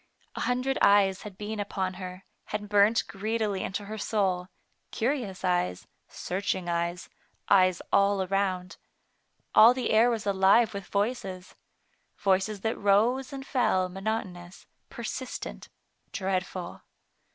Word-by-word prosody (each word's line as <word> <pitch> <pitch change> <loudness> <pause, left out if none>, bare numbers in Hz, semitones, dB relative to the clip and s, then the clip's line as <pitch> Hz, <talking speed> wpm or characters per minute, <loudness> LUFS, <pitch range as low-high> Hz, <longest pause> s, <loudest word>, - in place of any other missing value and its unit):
A - - -5
hundred 255 +2 0
eyes 200 -1 +4
had 205 -3 -10
been 210 +1 -5
upon 190 -2 -2
her, 185 +1 -8 0.2
had 210 0 -4
burnt 205 +2 +4
greedily 215 -1 -2
into 200 +2 -4
her 215 +1 -6
soul 190 -4 0 0.2
— - - -45
curious 225 -7 -2
eyes, 175 - 0 0.2
searching 185 -1 -3
eyes, 170 +1 -2 0.4
eyes 185 -2 +4
all 200 -1 +3
around. 185 -1 -1 0.8
All 225 +3 +8
the 255 -2 -1
air 225 +3 +5
was 230 -4 -2
alive 200 +4 +4
with 200 -1 -6
voices 200 -4 -2
r - - -24 0.7
voices 195 +1 +1
that 220 +2 -2
rose 230 +7 +2
and 270 -1 -7
fell 190 -9 +1
monotonous, 190 -2 -5 0.2
persistent, - - -6 0.4
dreadful. 185 -2 -3
200 Hz, 130 wpm, -28 LUFS, 185-220 Hz, 0.8 s, All